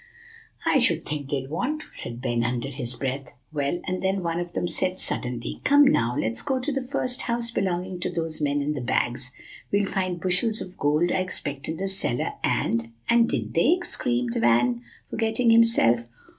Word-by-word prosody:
"I 275 - +4
should 245 - +2
think 145 -2 -4
they'd 135 -2 -2
want 280 - -1
to," - - -12
said 120 +2 -7
Ben, 120 -2 +1
under 120 +2 -1
his 125 -3 -4
breath. 135 0 -3 0.2
"Well, 145 +3 0
and 185 0 -2
then 190 0 0
one 170 0 -1
of 175 0 -5
them 175 - -1
said 185 +1 -1
suddenly, 125 -1 -4
'Come, 285 +1 +6
now, 120 - +3
let's 115 +1 0
go 265 - 0
to 255 +4 -1
the 270 -1 -1
first 255 -1 -1
house 235 -1 0
belonging 185 -3 -1
to - - -1
those 165 -3 -3
men 145 0 +1
in 150 +1 0
the 140 - -4
bags; 120 +2 0 0.4
we'll 200 0 +3
find 185 -3 -1
bushels 185 +5 +1
of 185 0 -7
gold 150 +5 +2
I - - +2
expect 145 -6 -3
in 160 - -3
the 195 - -2
cellar, 190 -10 -1
and" 115 0 0 0.2
"And 235 0 +5
did 115 -5 -2
they?" 305 - +4
screamed 120 - -1
Van, 120 +1 +3 0.3
forgetting 225 +1 +2
himself. 120 - +4
165 Hz, 190 wpm, -25 LUFS, 125-205 Hz, 0.4 s, Come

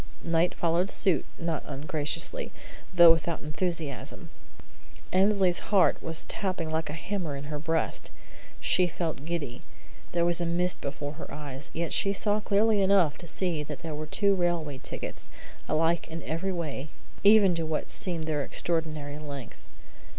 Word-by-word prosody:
'" - - -26
Knight 170 +1 +2
followed 170 +3 +1
suit, 190 -3 +4
not 165 -3 -2
ungraciously, 150 - -2 0.4
though 175 -2 +9
without 165 0 +1
enthusiasm. 155 -2 -4 0.8
Annesley's 190 -2 +4
heart 200 -3 +4
was 165 -1 -1
tapping 185 -5 0
like 160 -1 -1
a - - -4
hammer 165 -2 -3
in 140 - -6
her 150 0 -4
breast. 160 +1 -1 0.5
She 180 -1 +3
felt 160 -4 -3
giddy. 150 -7 -3 0.5
There 170 -1 +2
was 175 0 +2
a - - 0
mist 175 +1 0
before 145 +1 -4
her - - -9
eyes; 145 -2 -6
yet 165 0 -2
she 195 -1 +2
saw 205 +1 +1
clearly 210 0 +3
enough 190 -6 +4
to 170 - -8
see 170 -1 0
that 150 -1 -6
there 160 -2 -4
were 155 +1 -5
two 200 +5 +2
railway 170 -6 0
tickets, - - -5 0.4
alike 165 +2 +2
in 165 0 -6
every 165 +5 -2
way, 155 -5 -3 0.4
even 200 -2 +7
to 165 -1 -2
what 155 -1 +1
seemed 170 -4 0
their 155 -2 -1
extraordinary 155 -3 -2
length. 140 -4 -8
165 Hz, 160 wpm, -28 LUFS, 150-180 Hz, 0.8 s, though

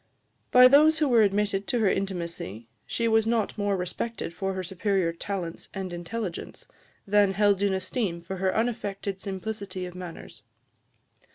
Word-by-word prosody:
By 250 0 +9
those 305 +4 +6
who 305 -1 +2
were 240 -4 +5
admitted 200 -1 +1
to 245 - +1
her 215 - +4
intimacy, 170 - -3 0.2
she 230 - 0
was 225 -1 +3
not 230 -2 0
more 205 -2 0
respected 180 +2 -4
for 195 +2 -2
her 185 - -3
superior 185 -1 0
talents 175 -1 -5
and 190 -2 -4
intelligence, 175 +2 -5 0.4
than 205 -1 +3
held 200 0 +3
in 200 -1 +2
esteem 190 -1 -2
for 190 +3 -5
her 190 +1 +1
unaffected 200 -4 -2
simplicity 195 -1 -5
of 180 - -8
manners. 180 -2 -9
195 Hz, 155 wpm, -27 LUFS, 185-220 Hz, 0.4 s, By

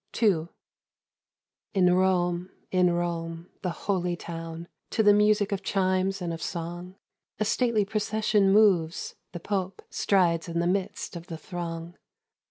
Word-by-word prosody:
II. 185 -8 +3 1.3
In 180 -2 +5
Rome, 180 -1 +1 0.2
in 180 -1 +4
Rome, 170 0 -3
in - - -38
the 185 - -1
holy 180 0 -1
town, 165 0 -7 0.2
To 220 - +1
the 205 -1 +7
music 210 0 +3
of 200 -1 -1
chimes 190 0 0
and 170 -1 -2
of 165 - -6
song, 175 +2 -5 0.4
A 215 - +1
stately 225 -1 +2
procession 210 -1 +1
moves, 190 -6 +3 0.2
the 175 - -6
Pope 190 +1 -3
Strides 175 -4 +2
in 170 0 -3
the 170 - +1
midst 185 0 -2
of 170 +1 -8
the 165 - -6
throng. 170 +1 -6
180 Hz, 145 wpm, -27 LUFS, 170-200 Hz, 1.3 s, the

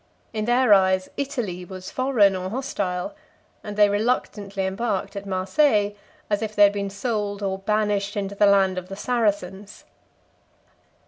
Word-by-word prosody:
In 215 -1 -2
their 240 -1 +4
eyes, 190 -1 +3
Italy 240 - -3
was 185 +1 -9
foreign 240 -7 +3
or 185 0 -4
hostile; 200 -2 -3 0.5
and 210 -1 -7
they 210 -1 +6
reluctantly 205 -2 -1
embarked 195 0 -2
at 200 0 -6
Marseilles, 205 +3 +2 0.3
as 205 0 0
if 215 -1 -4
they 205 - +6
had 205 0 +6
been 200 -1 -3
sold 205 -1 -3
or 190 -1 -2
banished 205 0 0
into 200 -1 -3
the 205 +1 +4
land 190 -2 +3
of 185 0 -13
the 195 - -6
Saracens. 205 -4 -2
200 Hz, 150 wpm, -24 LUFS, 190-215 Hz, 0.5 s, they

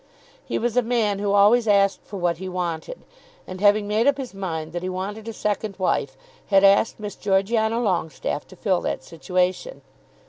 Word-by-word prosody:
He - - -3
was 240 0 -1
a 250 - +5
man 225 -4 0
who 200 0 0
always 210 +4 +5
asked 200 -1 +3
for 205 - -7
what 175 -2 0
he 190 +2 -6
wanted; 180 - -4 0.4
and 185 0 -8
having 205 0 +4
made 215 +4 +1
up 285 -1 +3
his 265 -5 -6
mind 165 -5 -5
that 175 - -3
he 185 - -3
wanted 200 +4 -5
a - - -3
second 210 -2 -3
wife, 140 -8 -1 0.3
had 195 -1 +4
asked 200 +3 +4
Miss 210 -1 -5
Georgiana 220 +3 +1
Longestaffe 175 -8 -2
to 185 - -14
fill 185 -1 0
that - - -3
situation. 180 - -2
200 Hz, 185 wpm, -23 LUFS, 185-220 Hz, 0.4 s, a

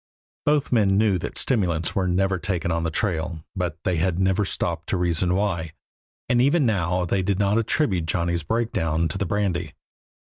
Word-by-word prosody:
Both 145 -1 +2
men 100 -5 +3
knew 105 -3 +3
that - - -6
stimulants 85 - 0
are 95 -2 +1
never 95 +1 +1
taken 85 -2 -2
on 80 0 0
the 80 - -1
trail, 80 -3 -2
but 90 -4 -2
they 90 -2 0
had 85 +1 0
never 95 +2 +2
stopped - - -3
to - - +1
reason 90 0 +1
why, 85 -6 -1 0.5
and 120 0 +3
even 140 +3 +3
now 90 -4 +1
they 95 +2 0
did 95 0 0
not 100 +2 +2
attribute 100 - 0
Johnny's 85 0 0
breakdown 80 -4 0
to 95 - -4
the 100 - -1
brandy. 90 -5 -1
90 Hz, 180 wpm, -24 LUFS, 85-105 Hz, 0.5 s, men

